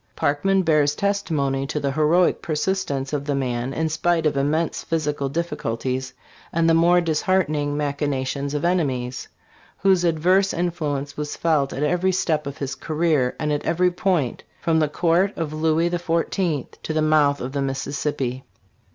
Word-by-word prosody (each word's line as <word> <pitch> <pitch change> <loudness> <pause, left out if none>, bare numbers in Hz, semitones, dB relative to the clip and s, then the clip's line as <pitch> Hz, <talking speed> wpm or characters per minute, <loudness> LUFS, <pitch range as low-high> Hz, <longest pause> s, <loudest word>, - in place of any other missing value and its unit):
Parkman 190 +7 +1
bears 150 -3 +3
testimony 150 -10 0
to 150 - -2
the 140 -1 -1
heroic 155 +5 +2
persistence 155 -4 -2
of 145 -1 -1
the 145 -1 0
man 125 -1 -2
in 160 +3 -1
spite 165 +1 0
of 150 - +2
immense 150 +4 0
physical 150 -4 -1
difficulties 130 -5 -3 0.4
and 165 0 +2
the 165 - +5
more 175 +2 +5
disheartening 155 -3 0
machina 145 -2 -1
tions 140 +2 -3
of 150 - -1
enemies, 130 -8 -1 0.5
whose 190 -2 +3
adverse 180 +4 +2
influence 150 -5 -2
was 150 0 -4
felt 150 -5 +1
at 140 - -3
every 180 +4 +2
step 155 -5 0
of 140 +1 -6
his 140 -3 -3
career 155 -5 0
and 150 -1 0
at 145 - -2
every 180 +2 +2
point, 175 -8 0 0.2
from 160 -1 +1
the 155 -2 +2
court 175 +5 +1
of 160 -2 -3
Louis 160 +2 +1
XIV. 170 -3 -1
to 155 - -4
the 155 0 +1
mouth 150 -2 +3
of 125 - -4
the 140 0 -2
Missis 135 +1 -3
sippi. 130 -4 -2
155 Hz, 165 wpm, -23 LUFS, 140-170 Hz, 0.5 s, the